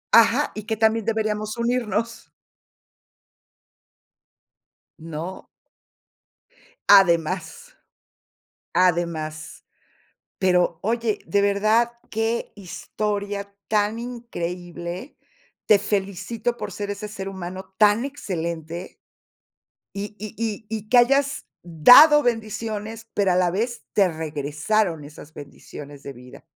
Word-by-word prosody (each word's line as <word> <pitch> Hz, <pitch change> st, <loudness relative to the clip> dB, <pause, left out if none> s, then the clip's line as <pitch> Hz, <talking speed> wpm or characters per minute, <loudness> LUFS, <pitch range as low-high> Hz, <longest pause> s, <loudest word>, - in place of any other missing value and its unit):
Ajá, 230 Hz, +5 st, +5 dB
y 215 Hz, -1 st, -7 dB
que 220 Hz, -, -1 dB
también 220 Hz, 0 st, +2 dB
deberíamos 215 Hz, -1 st, -1 dB
unirnos 235 Hz, -2 st, -2 dB, 2.7 s
¿no? 165 Hz, +3 st, -7 dB, 1.4 s
Además 195 Hz, -, +3 dB, 1.0 s
además, 165 Hz, -3 st, -1 dB, 0.7 s
pero 180 Hz, -3 st, +2 dB
oye, 225 Hz, 0 st, 0 dB
de 200 Hz, 0 st, +2 dB
verdad, 215 Hz, +4 st, +2 dB, 0.2 s
qué 225 Hz, +1 st, -1 dB
historia 200 Hz, +1 st, -4 dB
tan 210 Hz, +1 st, +1 dB
increíble, 180 Hz, -, -6 dB, 0.5 s
te 210 Hz, -, +6 dB
felicito 205 Hz, +4 st, -2 dB
por -, -, -6 dB
ser 205 Hz, -1 st, -5 dB
ese 205 Hz, +1 st, -5 dB
ser 195 Hz, -2 st, -6 dB
humano 190 Hz, 0 st, -8 dB
tan 210 Hz, +3 st, +4 dB
excelente 170 Hz, -, -5 dB, 1.0 s
y 205 Hz, +1 st, -5 dB
y 215 Hz, 0 st, -7 dB, 0.4 s
y-y 215 Hz, -1 st, -5 dB
que 245 Hz, -, +5 dB
hayas 275 Hz, +3 st, +3 dB, 0.2 s
dado 245 Hz, -, +8 dB
bendiciones, 225 Hz, -1 st, -3 dB
pero 200 Hz, -2 st, +2 dB
a -, -, +1 dB
la 180 Hz, -1 st, +2 dB
vez, 235 Hz, +6 st, -2 dB
te 200 Hz, -3 st, +5 dB
regresaron 155 Hz, +3 st, -1 dB
esas 150 Hz, +1 st, -13 dB
bendiciones 145 Hz, 0 st, -11 dB
de 140 Hz, -, -7 dB
vida. 125 Hz, 0 st, -14 dB
205 Hz, 95 wpm, -23 LUFS, 175-225 Hz, 2.7 s, dado